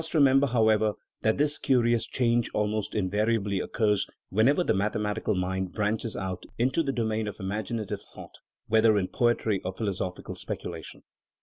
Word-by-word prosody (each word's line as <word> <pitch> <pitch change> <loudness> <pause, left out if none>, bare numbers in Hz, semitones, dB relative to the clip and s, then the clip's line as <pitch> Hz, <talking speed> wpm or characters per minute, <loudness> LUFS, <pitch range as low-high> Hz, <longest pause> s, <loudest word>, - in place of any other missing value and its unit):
213 150 -4 +4
remember, 135 +1 +4
however, 110 -3 +3 0.3
that 110 - +2
this 145 +1 +2
curious 120 -3 +2
change 120 -2 +1
almost 105 0 -1
in 100 -3 +1
variably 105 0 0
occurs 105 0 +1 0.2
whenever 125 - +3
the - - +2
mathematical 105 +1 -1
mind 95 0 -2
branches 110 +1 -1
out 95 -1 -4
into 130 +7 +2
the 140 -4 -1
domain 110 -3 -1
of 105 - -6
imaginative 105 +2 -3
thought, - - -13 0.3
whether 110 -1 +4
in 95 -2 0
poetry 115 -4 +1
or 95 - -2
philosophical 95 -3 -4
speculation. - - -7
110 Hz, 150 wpm, -27 LUFS, 100-120 Hz, 0.3 s, 213